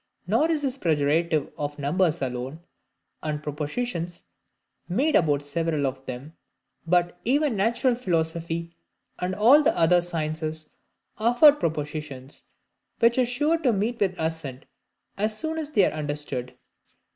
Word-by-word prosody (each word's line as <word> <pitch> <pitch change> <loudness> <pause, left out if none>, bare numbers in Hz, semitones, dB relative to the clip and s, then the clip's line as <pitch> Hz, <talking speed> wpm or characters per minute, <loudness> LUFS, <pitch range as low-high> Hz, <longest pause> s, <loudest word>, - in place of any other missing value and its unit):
Nor 315 - +2
is 310 -3 0
this 270 -1 -1
the - - -25
prerogative 155 -1 +1
of 145 0 -3
numbers 160 +2 +1
alone, 130 +4 -4 0.6
and 150 -1 -3
propositions 170 - -3 0.7
made 275 - +1
about 145 -4 +3
several 155 0 -1
of 135 0 -3
them; 130 +6 -7 0.5
but 175 0 +1
even 280 +1 +2
natural 235 +6 +2
philosophy, 170 -5 -2 0.4
and 180 +1 -2
all 245 +9 +6
the 295 - +2
other 175 +1 +5
sciences, 155 -2 -3 0.5
afford 245 +7 +6
propositions 150 -3 -4 0.6
which 235 +2 +3
are 250 - +3
sure 295 +7 +1
to 270 -6 +2
meet 225 +3 -1
with 190 -3 +1
assent 160 -5 -3 0.5
as 215 +1 +1
soon 320 +3 -2
as 300 -2 -4
they 205 -10 +4
are - - -1
understood. 145 -4 -4
170 Hz, 135 wpm, -25 LUFS, 150-235 Hz, 0.7 s, all